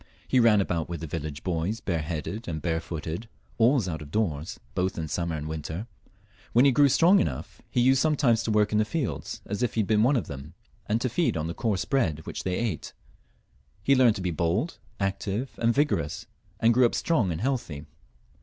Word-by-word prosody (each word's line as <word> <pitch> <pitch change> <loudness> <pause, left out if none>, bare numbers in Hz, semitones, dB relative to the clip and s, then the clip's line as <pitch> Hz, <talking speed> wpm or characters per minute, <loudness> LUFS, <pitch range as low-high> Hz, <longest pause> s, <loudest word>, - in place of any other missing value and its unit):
He 130 - +3
ran 110 -4 +5
about 85 -4 -2
with 85 -2 -5
the 80 - -4
viUage 75 -2 -5
boys 90 +5 -1
bareheaded 85 +5 -3
and 80 -3 -3
barefooted, 80 +4 -3 0.3
always 120 -2 +4
out 80 -4 -4
of 75 - -9
doors,, 90 -1 -2
both 95 0 -1
in 80 -2 -3
summer 85 +1 -2
and 75 0 -4
winter; 80 +5 -4 0.7
when 120 +4 +6
he 140 - +6
grew 140 +2 +5
strong 175 +8 +5
enough 65 -5 -3
he 125 - +1
used 130 +2 +4
sometimes 140 -7 +3
to 115 - -3
work 105 -1 +3
in 105 - +2
the - - +4
fields 105 - -3
as 100 +3 -4
if 125 - 0
he 110 - +3
had 100 - -2
been 110 -1 +3
one 130 +6 +4
of 120 - 0
them, 70 +1 -9 0.3
and 110 +2 +1
to 130 - +1
feed 155 - 0
on 80 - -2
the 85 - -3
coarse 105 -2 -1
bread 80 - 0
which - - -5
they 90 -1 -1
ate. 110 -10 -3 0.9
He 140 - +4
learned 125 -4 +5
to 95 - -5
be 90 - 0
bold, 85 - -1 0.2
active, 100 +5 -2
and 115 0 +3
vigorous, 135 - 0 0.3
and 115 +1 +4
grew 125 +1 +5
up - - -4
strong 120 - +1
and 80 - -3
healthy. 105 - -2
100 Hz, 210 wpm, -27 LUFS, 80-120 Hz, 0.9 s, when